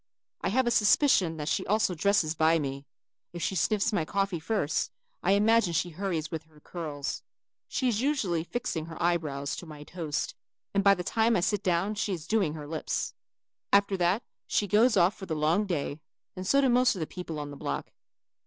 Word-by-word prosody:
I -, -, 0 dB
have 260 Hz, +5 st, +2 dB
a 240 Hz, -, +1 dB
suspicion 210 Hz, -, +4 dB
that 150 Hz, -1 st, -4 dB
she -, -, 0 dB
also 210 Hz, -2 st, +2 dB
dresses 175 Hz, -2 st, +2 dB
by 160 Hz, +1 st, +3 dB
me. 140 Hz, -2 st, -4 dB, 0.5 s
If 175 Hz, -, -5 dB
she -, -, 0 dB
sniffs 210 Hz, +4 st, +1 dB
my 175 Hz, -, +1 dB
coffee 195 Hz, +1 st, -1 dB
first, 160 Hz, -4 st, -1 dB, 0.3 s
I 190 Hz, -, +3 dB
imagine 210 Hz, -2 st, +3 dB
she 175 Hz, +2 st, 0 dB
hurries 165 Hz, -3 st, -3 dB
with 160 Hz, -1 st, -5 dB
her 155 Hz, -1 st, -21 dB
curls. 150 Hz, -4 st, -5 dB, 0.5 s
She 260 Hz, -, -1 dB
is 230 Hz, -2 st, +1 dB
usually 220 Hz, -, 0 dB
fixing 175 Hz, -6 st, -3 dB
her 165 Hz, -, -9 dB
eye 175 Hz, 0 st, +3 dB
brows 140 Hz, -3 st, -4 dB
to 175 Hz, -, -8 dB
my 150 Hz, -1 st, -9 dB
toast 155 Hz, -2 st, -3 dB, 0.4 s
and 200 Hz, 0 st, +2 dB
by 200 Hz, 0 st, +6 dB
the 180 Hz, -, -4 dB
time 225 Hz, +4 st, +2 dB
I -, -, +1 dB
sit 205 Hz, +2 st, +1 dB
down 190 Hz, +1 st, +1 dB
she 205 Hz, -1 st, -1 dB
is 165 Hz, -4 st, -5 dB
doing 195 Hz, -8 st, +1 dB
her 150 Hz, -2 st, -7 dB
lips. 155 Hz, +1 st, -3 dB, 0.6 s
After 200 Hz, 0 st, +4 dB
that 180 Hz, +6 st, +1 dB, 0.2 s
she 210 Hz, -, +1 dB
goes 215 Hz, +4 st, +4 dB
off 180 Hz, +2 st, +4 dB
for 190 Hz, -, -9 dB
the 160 Hz, -, -2 dB
long 160 Hz, +7 st, +2 dB
day 150 Hz, -4 st, -2 dB, 0.4 s
and 185 Hz, 0 st, -5 dB
so 275 Hz, +6 st, +4 dB
do 270 Hz, -, +3 dB
most 250 Hz, -1 st, +4 dB
of -, -, -5 dB
the 160 Hz, -, -1 dB
people 165 Hz, -2 st, -6 dB
in 145 Hz, -, -8 dB
the -, -, -8 dB
block. 70 Hz, -, -4 dB
180 Hz, 210 wpm, -28 LUFS, 160-210 Hz, 0.6 s, by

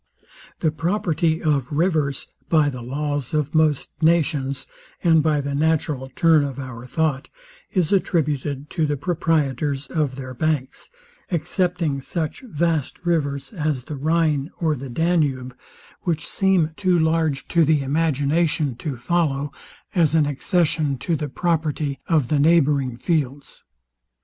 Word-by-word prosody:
The 160 Hz, -, +2 dB
property 165 Hz, -1 st, 0 dB
of 145 Hz, -4 st, +1 dB
rivers, 150 Hz, -3 st, 0 dB, 0.2 s
by 155 Hz, -3 st, +4 dB
the 125 Hz, -2 st, -7 dB
laws 145 Hz, +2 st, -3 dB
of 150 Hz, 0 st, 0 dB
most 155 Hz, -3 st, +2 dB
nations, 155 Hz, -5 st, +2 dB, 0.4 s
and 165 Hz, -2 st, +5 dB
by 150 Hz, -1 st, +2 dB
the 140 Hz, 0 st, -3 dB
natural 145 Hz, -3 st, 0 dB
turn 160 Hz, -3 st, +5 dB
of 140 Hz, -2 st, -4 dB
our 130 Hz, -3 st, -7 dB
thought, 150 Hz, 0 st, -1 dB, 0.4 s
Is 180 Hz, -2 st, +1 dB
attributed 145 Hz, -6 st, 0 dB
to 160 Hz, -2 st, 0 dB
the 145 Hz, 0 st, -1 dB
proprietors 145 Hz, -4 st, 0 dB
of 150 Hz, -5 st, -1 dB
their 130 Hz, -1 st, -7 dB
banks, 145 Hz, -1 st, -2 dB, 0.4 s
excepting 170 Hz, -3 st, -1 dB
such 160 Hz, +2 st, -3 dB
vast 165 Hz, -, -2 dB
rivers 145 Hz, -2 st, -1 dB
as 150 Hz, -7 st, -1 dB
the 150 Hz, -, -6 dB
Rhine 155 Hz, 0 st, +1 dB
or 160 Hz, -3 st, +2 dB
the 135 Hz, 0 st, -7 dB
Danube, 135 Hz, -4 st, 0 dB, 0.5 s
which 165 Hz, -4 st, -2 dB
seem 190 Hz, -5 st, +2 dB
too 185 Hz, -2 st, +2 dB
large 160 Hz, -3 st, +1 dB
to 170 Hz, -1 st, +4 dB
the 150 Hz, -2 st, +3 dB
imagination 150 Hz, 0 st, +1 dB
to 135 Hz, 0 st, -4 dB
follow 145 Hz, 0 st, 0 dB, 0.4 s
as 165 Hz, -4 st, +3 dB
an 155 Hz, -2 st, +4 dB
accession 150 Hz, 0 st, 0 dB
the 150 Hz, +3 st, -2 dB
property 150 Hz, -3 st, -1 dB
of 155 Hz, -7 st, +2 dB
the 150 Hz, -, +2 dB
neighbouring 140 Hz, -5 st, +3 dB
fields. 145 Hz, -2 st, -2 dB
150 Hz, 135 wpm, -22 LUFS, 140-165 Hz, 0.5 s, and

